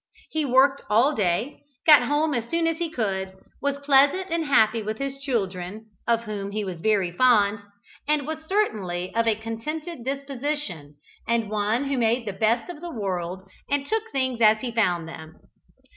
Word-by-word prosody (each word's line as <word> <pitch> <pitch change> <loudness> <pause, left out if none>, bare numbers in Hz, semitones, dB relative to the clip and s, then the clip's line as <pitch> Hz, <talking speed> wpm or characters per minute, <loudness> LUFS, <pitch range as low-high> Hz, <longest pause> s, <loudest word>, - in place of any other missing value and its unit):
He 310 -1 0
worked 270 +2 +4
all 235 +8 +4
day, 205 +5 -1 0.2
got 300 -4 +9
home 295 +2 +1
as 235 -2 -2
soon 335 0 +1
as 330 0 0
he 340 -1 -1
could, 190 -8 -2 0.3
was 280 0 0
pleasant 285 +7 +4
and 335 -1 0
happy 225 -5 +3
with 215 +1 -4
his 275 0 -4
children 215 -5 -3 0.2
(of 230 0 +2
whom 205 -3 -5
he 210 +1 -3
was 180 -4 -6
very 200 -4 +2
fond), 210 0 +4 0.5
and 300 -2 +1
was 315 +1 -5
certainly 190 - -1
of 230 0 +1
a 220 - +3
contented 240 +8 -6
disposition, 270 - -4 0.3
and 230 -2 0
one 215 +4 0
who 275 -2 -1
made 230 +1 +1
the 205 - -3
best 220 +4 +1
of 350 -4 -8
the 345 - -6
world 190 - -4 0.2
and 280 -1 0
took 445 +5 -2
things 260 -3 -1
as 215 0 +5
he 250 - -3
found 180 -8 +1
them. 160 -1 -10
230 Hz, 175 wpm, -25 LUFS, 205-285 Hz, 0.5 s, got